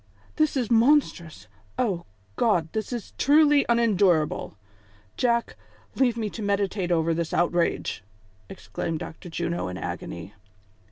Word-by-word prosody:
"This 310 -3 +2
is 245 -3 -1
monstrous! 225 - +2 0.3
O 190 -8 -1 0.3
God! 175 - +1
this 220 +1 -3
is 240 -4 -6
truly 295 0 +5
unendurable! 195 - +2 0.6
Jack, 235 -1 0 0.4
leave 245 -3 +1
me 220 -2 -1
to 225 - -7
meditate 200 -2 -1
over 165 -1 +2
this 165 0 -2
outrage," 175 -9 0 0.5
exclaimed 130 +11 -5
Dr. 160 +3 -8
Juno 170 +1 -2
in 90 0 -5
agony. 85 +2 -6
195 Hz, 120 wpm, -25 LUFS, 165-235 Hz, 0.6 s, truly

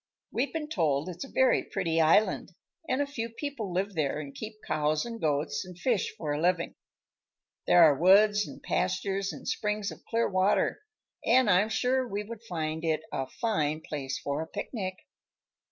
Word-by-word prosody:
We've 265 +4 -1
been 315 -2 -3
told 160 - 0
it's 175 +5 -6
a - - -13
very 260 -1 +4
pretty 165 -4 0
island, 185 +4 +3 0.4
and 260 +3 +2
a - - -3
few 235 -5 -4
people 230 -4 -5
live 195 +3 -1
there 150 -3 -1
and 140 -2 -7
keep 215 0 -7
cows 155 0 0
and 230 -1 -6
goats, 145 -1 0
and 180 -2 -11
fish 230 0 0
for 150 -2 -2
a 145 - -2
living. 175 0 +1 0.9
There 175 - +7
are 150 -3 +7
woods 205 +6 +5
and - - -11
pastures 190 +2 -1
and - - -10
springs 210 -1 -1
of - - -12
clear 230 0 +2
water, 190 - +2 0.4
and 250 +1 +4
I'm 195 +4 +4
sure 255 +4 +1
we 205 -2 -3
would 225 +1 -9
find 160 -7 -3
it 160 -2 +1
a 135 - -2
fine 155 - -1
place 140 -4 -4
for 140 +2 -3
a 160 - -5
picnic." 185 0 -4
185 Hz, 180 wpm, -29 LUFS, 155-225 Hz, 0.9 s, There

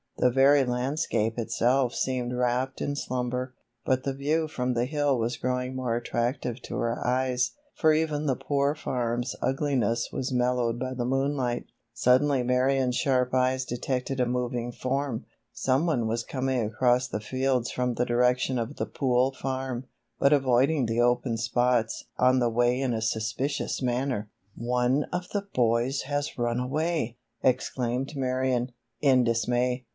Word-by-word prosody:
The 125 - +3
very 135 +2 +5
landscape 125 -3 -1
itself 125 +2 +1
seemed 125 -2 -1
wrapped 125 +1 0
in 145 - -1
slumber, 125 -1 -3 0.3
but 130 0 +1
the 135 - -1
view 150 +4 0
from 125 -4 -2
the 120 0 +1
hill 145 -1 +1
was 115 +1 -1
growing 125 +1 -2
more 125 -3 -1
attractive 120 +1 -2
to - - -6
her 115 0 -1
eyes, 125 0 +1 0.2
for 160 - +4
even 155 -1 0
the 135 -3 +2
Poor 140 +2 0
Farm's 120 -3 -2
ugliness 130 -5 0
was 130 - -3
mellowed 125 -1 +1
by 130 0 -3
the 120 -2 -2
moonlight. 135 -1 0 0.3
Suddenly 130 +2 +3
Marion's 125 0 +2
sharp 125 -2 +1
eyes 130 0 +2
detected 125 +2 -2
a 125 - +2
moving 120 -1 -2
form. 130 -1 -2 0.3
Some 135 +6 +1
one 125 -9 +1
was 115 +1 -1
coming 130 -2 -1
across 125 +3 +2
the 105 - -3
fields 130 +2 0
from 125 -1 -1
the 125 - +1
direction 125 +1 +2
of 115 +5 -4
the - - -1
Pool 130 -1 +1
Farm, 130 -1 -4 0.3
but 140 +1 +5
avoiding 135 +1 +3
the 115 +1 +1
open 120 -1 +2
spots 120 0 +1
on 130 +1 +4
the 120 -1 +2
way 120 +2 +2
in 130 -3 0
a 110 - -2
suspicious 115 +8 -1
manner. 125 -3 -1 0.3
"One 125 +4 +1
of 180 0 -4
the 200 -1 -3
boys 120 +3 +1
has 145 +2 -3
run 120 0 0
away!" 140 -2 -1 0.3
exclaimed 130 +1 0
Marion, 130 -1 0 0.3
in 130 -3 +4
dismay. 120 +2 0
125 Hz, 155 wpm, -27 LUFS, 120-135 Hz, 0.3 s, very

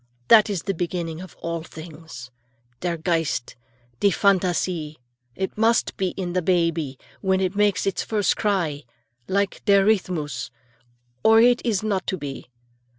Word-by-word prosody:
That 220 -1 +7
is 195 -5 -2
the 195 - -1
beginning 170 -1 -3
of 185 - -11
all 170 0 -2
things; 160 -6 -10 0.5
der 175 -1 -2
Geist, 165 -6 -1 0.4
die 200 - +4
Phantasie. 180 -4 +1 0.4
It 190 0 -3
must 225 +2 +2
be 190 - 0
in 180 -2 -3
the 180 - +1
baby, 165 -5 0 0.2
when 190 -1 +2
it 190 0 -1
makes 205 -1 +2
its 195 - 0
first 210 -3 +1
cry, 175 -9 0 0.5
like 200 +1 -1
der 200 -2 +5
Rhythmus, 155 - 0 0.7
or 225 0 +6
it 245 +1 +5
is 215 -5 0
not 200 -4 -1
to 190 - -1
be. 140 -4 -7
185 Hz, 150 wpm, -23 LUFS, 165-200 Hz, 0.7 s, That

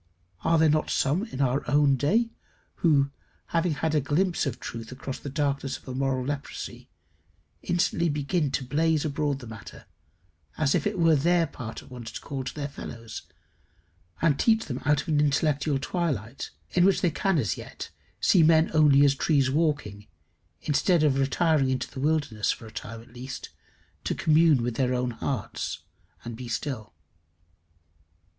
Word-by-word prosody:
Are 165 - +3
there 160 0 +5
not 155 0 +2
some 155 +10 +1
in 140 - -5
our 135 +1 +2
own 145 0 +4
day, 220 - +1 0.5
who, 140 -4 +3 0.4
having 170 -1 +1
had 155 +1 -1
a 150 - +3
glimpse 170 +4 +1
of 130 -2 -4
truth 115 0 -7
across 130 +1 -6
the 140 - -6
darkness 140 -2 -1
of - - -22
a 130 - -4
moral 130 -1 0
leprosy, 145 0 -5 0.7
instantly 170 -1 +1
begin 150 +2 0
to 135 - 0
blaze 155 +3 +1
abroad 145 -1 -1
the 130 - -10
matter, 110 -1 -10 0.7
as 150 -3 +2
if - - +1
it 210 - -2
were 165 -2 +5
their 170 +4 +3
part 115 -6 -8
at - - -17
once 120 -3 -7
to - - -5
call 135 -2 -5
to - - -5
their 145 -2 -3
fellows, 115 -5 -8 1.0
and 150 -4 +3
teach 225 -1 +3
them 125 -2 -5
out 145 0 +3
of - - -19
an 150 -2 +3
intellectual 145 0 +2
twilight, 135 - -3 0.2
in 180 - +3
which 195 +1 +4
they 175 - +2
can 195 +2 +1
as 110 - 0
yet - - -8 0.3
see 180 - +5
men 160 0 +5
only 145 -2 +6
as 140 - +4
trees 135 -2 +2
walking, 140 -10 -1 0.6
instead 155 +3 +2
of 140 -3 +3
retiring 140 +1 +2
into 130 0 -2
the 135 - -7
wilderness, 145 -7 0
for - - -7
a 110 - -11
time 115 +2 -7
at 120 - -20
least, 130 +2 -7 0.5
to - - -1
commune 155 -4 +4
with 120 -1 -2
their 125 -1 +1
own 125 0 0
hearts, 120 -2 -4 0.4
and 115 -1 -5
be 125 +1 -7
still? 115 - -4
140 Hz, 175 wpm, -27 LUFS, 130-160 Hz, 1.0 s, only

